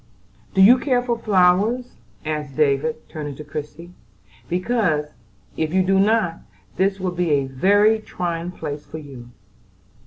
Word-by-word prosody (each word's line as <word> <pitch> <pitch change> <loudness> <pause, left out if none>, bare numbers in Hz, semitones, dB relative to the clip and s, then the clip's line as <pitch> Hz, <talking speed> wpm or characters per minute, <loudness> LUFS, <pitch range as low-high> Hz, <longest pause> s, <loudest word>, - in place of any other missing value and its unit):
"Do 190 - +6
you 245 +6 +7
care 250 -3 +1
for 240 -1 0
flowers?" 210 +3 +2 0.3
asked 150 -3 -4
David, 150 - 0
turning 145 -3 -6
to 150 - -9
Christie, 150 +4 -8 0.6
"because 180 -5 0 0.5
if 160 +2 -2
you 190 - +4
do 190 +1 +2
not, 200 -4 +2 0.4
this 195 +1 +1
will 185 -1 -2
be 175 -1 -1
a 140 -2 +2
very 205 +11 +3
trying 175 -4 -4
place 150 -4 -6
for 160 - -9
you." 135 -6 -11
180 Hz, 145 wpm, -21 LUFS, 150-205 Hz, 0.6 s, you